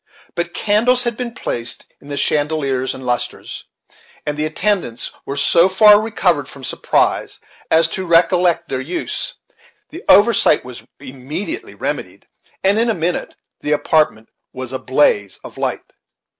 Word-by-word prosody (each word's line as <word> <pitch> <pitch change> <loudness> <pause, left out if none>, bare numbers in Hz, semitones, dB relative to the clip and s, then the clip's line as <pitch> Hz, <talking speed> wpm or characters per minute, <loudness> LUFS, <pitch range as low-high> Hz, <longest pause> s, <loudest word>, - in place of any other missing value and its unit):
But 170 0 -3
candles 235 +4 +2
had 240 -2 -1
been 245 0 -4
placed 115 0 -3 0.2
in - - -16
the 145 -1 -5
chandeliers 140 -3 0
and 130 - -9
lustres, 125 -1 -3 0.6
and 150 - -2
the 150 +1 -1
attendants 175 - -2 0.2
were 140 - -3
so 170 +5 +4
far 210 +2 +7
recovered 180 -10 0
from 140 - -12
surprise - - 0 0.3
as 160 +1 +4
to 190 -1 -4
recollect 170 0 +3
their 130 -1 -3
use; 180 - -4 0.6
the 340 +4 -9
oversight 205 - +5
was 125 -1 -9 0.2
immediately 140 - -6
remedied, - - -5 0.4
and 200 +3 +4
in 230 +1 +2
a 225 - +1
minute 170 +1 -2 0.2
the 150 - -1
apartment 145 -6 +1 0.2
was 130 0 -6
in - - -1
a - - -19
blaze 115 -7 +2
of - - -11
light. - - -3
160 Hz, 150 wpm, -18 LUFS, 135-205 Hz, 0.6 s, far